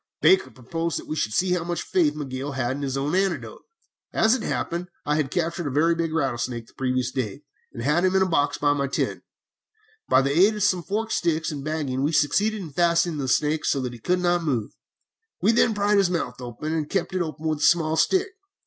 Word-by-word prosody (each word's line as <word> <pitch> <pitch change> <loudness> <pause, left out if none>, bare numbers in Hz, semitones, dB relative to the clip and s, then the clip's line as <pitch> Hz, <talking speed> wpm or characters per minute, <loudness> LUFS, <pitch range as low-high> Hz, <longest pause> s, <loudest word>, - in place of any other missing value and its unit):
"Baker 380 - +4
proposed 165 +7 -3
that - - -7
we 155 - -4
should 110 -8 -1
see 180 +11 +1
how 180 -2 0
much 175 0 -3
faith 155 -5 +1
Miguel 140 -1 -5
had 130 -1 -1
in 145 - -6
his 135 -1 -2
own 140 +3 -1
antidote. 190 -1 -1 0.5
As 220 +1 +3
it 260 - 0
happened, 175 -5 -3 0.2
I 150 - +1
had 150 -3 0
captured 170 0 -2
a - - -1
very 155 +5 +3
big 165 -1 -2
rattlesnake 125 -6 -2
the - - -22
day - - -47
previous, 130 -1 -1 0.6
and 115 - -7
had 150 +6 +2
him 185 0 +2
in 190 - +5
a - - 0
box 145 -4 +1
in 145 0 +2
my 140 -1 0
tent. 135 - -2 0.9
By 130 - +5
the 140 +1 0
aid 200 +6 +5
of 210 - -1
some 185 -3 +2
forked 220 +5 -3
sticks 165 -1 0
and 145 -2 -6
bagging 145 -4 -2
we 145 +4 0
succeeded 200 +9 +2
in 160 - -8
fastening 170 -1 +2
the 135 - -2
snake 150 +4 +1
so 140 - +1
that 125 -1 -4
he 120 - -10
could 180 +10 +1
not 175 -1 +1
move. 125 -9 -1 0.7
We 215 - +3
then 230 -1 +3
pried 205 0 +3
his 195 -3 +3
mouth 170 -6 -3
open, 125 +6 -5
and 155 -2 -2
kept 195 - -1
it 185 - 0
open 155 -2 -5
with 155 -1 -1
a - - -9
small 160 0 +3
stick. 380 - +2
155 Hz, 230 wpm, -24 LUFS, 140-180 Hz, 0.9 s, in